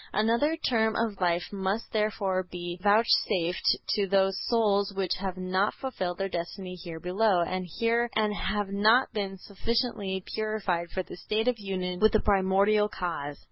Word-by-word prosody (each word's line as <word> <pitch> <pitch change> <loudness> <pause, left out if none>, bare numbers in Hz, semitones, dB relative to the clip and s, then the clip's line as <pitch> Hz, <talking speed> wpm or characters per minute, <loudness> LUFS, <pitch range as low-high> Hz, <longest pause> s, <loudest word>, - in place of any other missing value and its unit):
Another 235 +9 +2
term 225 -7 +1
of 220 -4 -1
life 175 +2 0
must 195 +3 -2
therefore 210 -3 0
be 175 -1 -7
vouchsafed 205 -4 +3
to 205 -2 +1
those 195 0 +3
souls 205 -4 +2
which 190 -2 0
have 190 -1 -4
not 185 +2 0
fulfilled 185 -10 -4
their 195 - -1
destiny 180 +1 -5
here 170 -2 -8
below, 185 +2 +2
and 185 +1 -3 0.7
have 205 0 -2
not 215 +6 +3
been 195 -2 -3
sufficiently 200 -1 -2
purified 200 -6 -1
for 185 - -3
the - - -10
state 215 +5 -1
of 245 -3 +1
union 185 -3 -3
with 215 +2 +4
the 220 - +5
Primordial 200 +1 +3
Cause. 165 -7 -4
195 Hz, 150 wpm, -28 LUFS, 185-215 Hz, 0.7 s, the